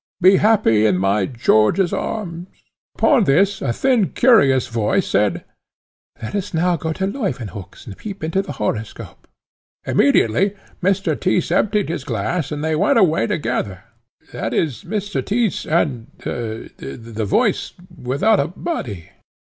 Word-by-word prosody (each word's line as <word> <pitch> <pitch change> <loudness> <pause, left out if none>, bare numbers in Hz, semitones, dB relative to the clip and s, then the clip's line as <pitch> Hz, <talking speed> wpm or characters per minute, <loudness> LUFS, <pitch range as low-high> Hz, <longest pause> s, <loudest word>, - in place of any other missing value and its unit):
Be 185 +2 +6
happy 185 - +3
in 90 - +2
my 95 +2 +1
George's 120 - +2
arms!' 175 -5 -4 0.5
Upon 255 -8 +3
this 195 +7 +2
a - - 0
thin 245 - +2
curious 140 - +4
voice 115 -3 0
said, - - +1 0.8
'Let 110 - -6
us 200 -3 -3
now 175 +2 +2
go 160 0 -3
to 190 - -2
Leuwenhock's, 125 - -5
and 100 - -9
peep 200 -5 -8
into 165 +5 0
the 145 - -7
horoscope.' 105 -1 -5 0.6
Immediately 190 - +2 0.3
Mr. 185 -3 +1
Tyss 180 +1 0
emptied 210 -2 +1
his 165 -5 -3
glass, 135 - -2
and 150 0 -4
they 160 0 0
went 275 - +2
away 180 -5 +3
together 120 - -2 0.5
that - - -3
is, 140 -10 -1
Mr. 205 +1 -3
Tyss 220 -2 -1
and 140 -8 0
the 110 - -6
voice - - +1 0.2
without 150 - +1
a 140 - +1
body. 125 - -5
160 Hz, 140 wpm, -20 LUFS, -, 0.8 s, Be